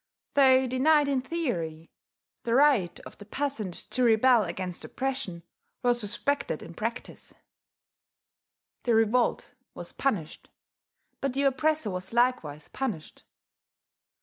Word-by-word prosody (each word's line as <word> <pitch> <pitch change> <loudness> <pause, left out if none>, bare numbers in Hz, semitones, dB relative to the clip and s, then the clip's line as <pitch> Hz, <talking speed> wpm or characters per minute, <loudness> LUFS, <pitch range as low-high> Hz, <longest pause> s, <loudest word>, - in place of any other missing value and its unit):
Though 265 -2 +6
denied 285 +4 +3
in 275 -2 +1
theory, 175 - -3 0.5
the 235 0 0
right 255 -11 +3
of - - -13
the 205 - -10
peasant 225 -6 -3 0.2
to 255 - 0
rebel 235 0 +5
against 180 0 -5
oppression 260 -11 -4 0.4
was 240 -1 +2
respected 230 - -2
in 170 - -10
practice; 230 +7 -6 1.5
the 235 -2 +2
revolt 225 +2 +1 0.2
was - - -9
punished, 205 - -2 0.7
but 275 -2 -2
the 280 - +1
oppressor 280 -3 +1
was 185 +3 -6
likewise 230 - 0
punished. 220 -13 -5
240 Hz, 115 wpm, -28 LUFS, 190-270 Hz, 1.5 s, Though